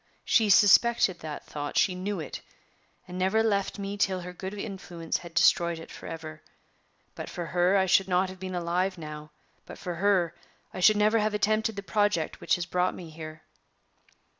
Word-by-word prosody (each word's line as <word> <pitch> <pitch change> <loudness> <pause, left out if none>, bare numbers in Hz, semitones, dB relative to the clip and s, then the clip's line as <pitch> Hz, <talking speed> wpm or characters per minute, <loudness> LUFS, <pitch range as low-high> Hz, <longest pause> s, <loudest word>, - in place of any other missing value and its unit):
She 220 -3 +3
suspected 205 -1 +5
that 155 -2 -7
thought; 145 -1 -5
she 185 - +3
knew 190 +1 -3
it, 155 - -6 0.7
and 180 0 -6
never 190 +4 +2
left 200 -3 0
me 200 0 -5
till 190 -2 0
her 180 +1 -8
good 190 +2 -6
influence 190 -5 -4
had 170 -1 -12
destroyed 170 0 +4
it 165 - -11
forever. 155 -1 -8 0.7
But - - -7
for 175 - -5
her 180 +3 +2
I 190 - +3
should 190 +1 +3
not 185 0 +2
have 185 0 -10
been 185 -1 -5
alive 180 +2 -1
now; 150 -1 -8 0.4
but - - -9
for 180 - -5
her 185 -3 +2 0.4
I - - -6
should 210 +3 +5
never 215 +2 +3
have 210 0 0
attempted 215 +1 +1
the 200 - -6
project 205 -6 0
which - - +2
has 175 - -3
brought 180 +1 0
me 170 -3 -9
here." 155 0 -9
185 Hz, 185 wpm, -27 LUFS, 170-200 Hz, 0.7 s, suspected